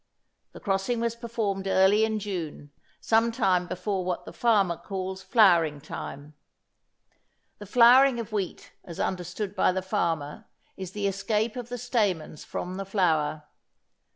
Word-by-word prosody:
The - - -10
crossing 200 +4 -1
was 235 0 -1
performed 220 -5 -3
early 195 +3 +4
in 220 0 -2
June, 175 -8 -5 0.3
sometime 220 -6 +2
before 185 +1 -2
what 180 -1 -3
the - - -9
farmer 205 -7 +2
calls 190 +1 -5
flowering 180 - +4
time. 145 0 -8 1.3
The 205 - -9
flowering 250 +3 +6
of 230 -1 -6
wheat 200 -4 -4
as 170 - -10
understood 185 +2 -3
by - - +3
the 185 0 -3
farmer 165 -7 -2 0.3
is 190 -1 -7
the 205 -1 -3
escape 210 +3 -1
of 245 -1 -6
the 245 - -4
stamens 205 - -1
from 180 +1 -5
the 195 - -4
flower. 160 -6 0
195 Hz, 140 wpm, -27 LUFS, 180-220 Hz, 1.3 s, flowering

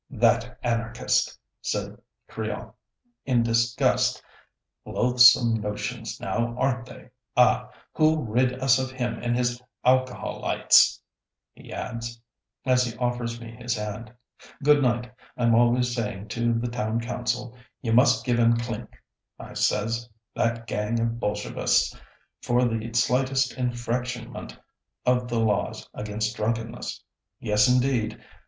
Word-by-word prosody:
"That - - +1
anarchist!" 115 0 0 0.2
said - - -3 0.3
Crillon, - - -5 0.5
in 125 -3 +2
disgust; 115 0 +2 0.6
"loathsome 125 -2 +5
notions, 105 +2 -4
now, 120 0 -2
aren't 125 -2 0
they? - - -13 0.3
Ah! - - +4 0.2
who'll 155 0 +3
rid 125 +3 +1
us 130 0 +4
of 130 0 -2
him 125 -2 -3
and 120 0 0
his 125 0 -1 0.2
alcoholytes?" 130 0 +3 0.5
he - - -14
adds, 115 -1 -5 0.5
as 125 -1 +4
he 115 -2 -5
offers 120 -1 -2
me 115 -1 -9
his 120 +1 -3
hand. 105 +1 -5 0.5
"Good 145 0 +5
night. 125 -1 0 0.2
I'm 120 -1 +3
always 120 +1 +3
saying 105 -3 -4
to 120 0 0
the 115 +1 -1
Town 115 -1 -2
Council, 120 0 -3 0.3
'You 115 -2 0
must 125 +4 +4
give 120 -2 +1
'em 115 0 +4
clink,' 115 -1 -6 0.3
I - - -10
says, 115 +3 0 0.2
'that 115 0 -1
gang 105 +1 -1
of 115 0 -1
Bolshevists, 105 - 0 0.5
for 120 +1 +2
the 115 -1 -2
slightest 130 +2 +2
infractionment 120 -1 -3 0.5
of 125 0 +2
the 120 -1 -1
laws 105 -3 0
against 105 +2 -3
drunkenness.' 115 +1 -3 0.4
Yes, 105 +3 +3
indeed! 125 -4 +1
120 Hz, 125 wpm, -25 LUFS, 115-125 Hz, 0.6 s, loathsome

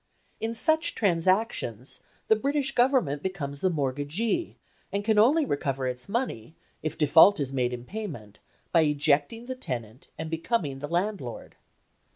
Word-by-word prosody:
In 225 +1 -3
such 315 +7 +2
transactions 180 - 0 0.3
the 220 - +5
British 275 +3 0
Government 245 - +2
becomes 145 -7 -4
the 185 - +3
mortgagee, 155 - -1 0.3
and 200 0 -2
can 220 -1 +3
only 285 +8 +5
recover 135 - -2
its 125 +6 -3
money, 185 - -3 0.3
if 155 - -4
default 160 +5 +6
is 135 -2 -2
made 125 -2 0
in 125 0 -6
payment, 145 - -7 0.3
by 165 - +5
ejecting 150 +8 +1
the 260 - -4
tenant 125 - -6
and 160 0 -5
becoming 165 - -1
the 145 - -5
landlord. 175 - -3
165 Hz, 145 wpm, -27 LUFS, 140-225 Hz, 0.3 s, default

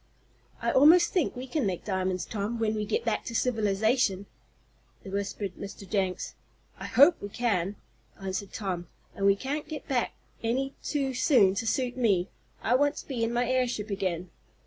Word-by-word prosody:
"I - - +2
almost 325 +6 +6
think 350 -8 +1
we 250 +1 -5
can 265 -3 -1
make 180 -3 -3
diamonds, 185 -3 -1
Tom, 215 +2 -3
when 220 -1 +1
we 215 -1 -2
get 455 - -1
back - - 0
to 230 - -5
civilization," 220 -2 +1 0.8
whispered 200 0 -3
Mr. 200 0 -8
Jenks. 190 -2 -1 0.5
"I - - -5
hope 290 +6 +6
we 200 - -5
can," 205 -4 0 0.4
answered 195 0 -4
Tom, 180 -5 -3 0.3
"and 195 - +1
we 200 - +6
can't 285 +7 -4
get 310 -2 -6
back 255 -4 0 0.3
any 265 +4 0
too 275 -3 -1
soon 245 - +4
to 225 +3 -2
suit 250 +1 0
me. 200 -7 +2 0.3
I 235 - +2
want 290 +3 +3
to - - -8
be 250 -5 -2
in 230 - 0
my 240 0 +1
airship 245 -4 0
again." 185 -3 -2
220 Hz, 170 wpm, -28 LUFS, 195-255 Hz, 0.8 s, almost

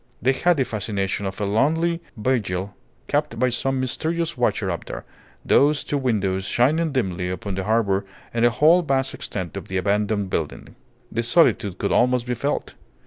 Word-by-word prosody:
They 125 +6 +3
had 175 +5 +2
the 135 - +2
fascination 100 -2 -2
of 95 - -6
a 105 - 0
lonely 160 +11 +1 0.2
vigil 100 -5 -1 0.3
kept 145 -5 0
by 130 +2 +2
some 135 +2 -1
mysterious 165 +6 -1
watcher 115 -6 0
up 85 - -5
there, - - -7 0.4
those 145 +1 +4
two 145 - -1
windows 100 -7 0
shining 155 +10 +2
dimly 95 -9 -1
upon 90 +2 -4
the 95 0 -3
harbour 105 -3 +2 0.3
in 115 - 0
the 120 - +6
whole 155 +9 +5
vast 135 -4 0
extent 95 -3 -5
of 100 - -6
the 95 - -2
abandoned 100 +1 0
building. 80 -3 -4 0.4
The 115 - 0
solitude 120 - +3
could 100 - -1
almost 125 0 +3
be 125 - -1
felt. 140 +5 -2
115 Hz, 175 wpm, -23 LUFS, 100-135 Hz, 0.4 s, the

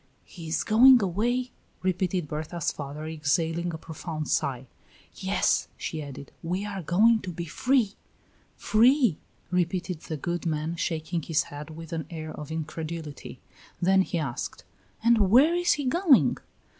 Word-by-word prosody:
"He 170 -3 -10
is 160 +1 0
going 245 +5 +7
away!" 240 +6 0 0.3
repeated 185 -2 0
Berta's 155 +2 -3
father, 145 +1 -7
exhaling 160 +2 0
a 160 - -5
profound 160 -1 -6
sigh. 130 -2 0 0.5
"Yes," - - +1
she 155 - -4
added; 140 -1 -9
"we 180 +4 -2
are 200 -2 -4
going 215 +8 +4
to 185 - -6
be 170 0 -5
free." 235 - +1 0.6
"Free!" 240 - +4 0.3
repeated 180 -1 -1
the 155 -1 -6
good 170 +4 -3
man, 155 +1 -2
shaking 165 0 -2
his 155 0 +1
head 145 +1 -7
with 165 +1 -9
an 160 -2 -3
air 155 -2 -6
of 150 -2 -8
incredulity. 160 -1 -6 0.4
Then 190 +2 +4
he 185 -1 -2
asked: 140 -7 -4 0.4
"And 225 -4 +4
where 270 - +6
is 350 0 +3
he 290 - -3
going?" 315 0 +4
170 Hz, 145 wpm, -27 LUFS, 155-205 Hz, 0.6 s, going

